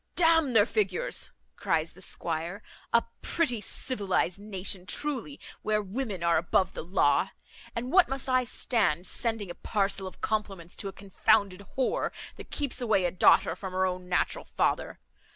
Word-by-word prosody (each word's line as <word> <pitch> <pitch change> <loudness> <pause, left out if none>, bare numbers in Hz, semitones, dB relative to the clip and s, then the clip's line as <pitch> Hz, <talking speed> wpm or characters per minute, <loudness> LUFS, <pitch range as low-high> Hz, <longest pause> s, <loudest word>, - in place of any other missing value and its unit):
"D 350 - +2
n 325 -5 +4
their 210 -3 +7
figures," 450 - -1 0.3
cries 160 0 0
the 185 - -15
squire; 170 +3 -2 0.3
"a 235 - +4 0.2
pretty 245 -10 0
civilised 200 -5 0
nation, 195 -2 -1
truly, 290 +2 -2 0.2
where 215 0 +1
women 205 -2 -4
are 170 -1 +4
above 180 +3 +1
the - - -5
law. 180 +4 +2 0.5
And 245 +2 -3
what 375 -1 +6
must 270 0 -2
I 255 -1 +3
stand 200 -9 +1
sending 225 -3 -2
a - - -5
parcel 195 0 0
of 185 - -11
compliments 195 -5 -3
to 200 - -3
a - - -4
confounded 195 0 +1
whore, 260 - +1 0.3
that - - -10
keeps 280 -4 -2
away 210 -6 +2
a 175 - +1
daughter 185 - +4
from 190 -2 -7
her 185 0 +2
own 180 -1 -3
natural 340 - 0
father? - - 0
205 Hz, 165 wpm, -28 LUFS, 185-250 Hz, 0.5 s, their